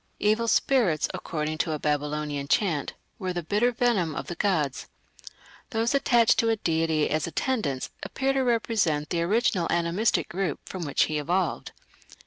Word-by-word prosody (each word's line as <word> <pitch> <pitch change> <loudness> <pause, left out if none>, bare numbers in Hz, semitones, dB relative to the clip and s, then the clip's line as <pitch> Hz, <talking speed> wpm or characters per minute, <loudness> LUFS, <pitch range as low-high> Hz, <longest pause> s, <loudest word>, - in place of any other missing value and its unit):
"Evil 215 +2 +2
spirits", 225 - +2
according 155 -1 -3
to 160 - 0
a - - -1
Babylonian 150 -1 -2
chant, 160 -5 +1 0.3
were 185 -1 -2
"the 175 -1 -3
bitter 210 +9 +2
venom 225 -10 +1
of - - -4
the - - -5
gods". 165 -8 -1 0.8
Those 230 +2 0
attached 240 -5 +4
to 230 - +3
a 225 - +3
deity 160 -5 +1
as 155 +1 0
"attendants" 170 - -2
appear 270 0 -1
to 270 - +1
represent 220 - 0
the 170 - 0
original 190 -1 +1
animistic 175 +6 +1
group 180 -4 -2
from 180 -3 -5
which 145 - +2
he 155 -1 -1
evolved. 175 +1 -1
175 Hz, 155 wpm, -26 LUFS, 155-225 Hz, 0.8 s, attached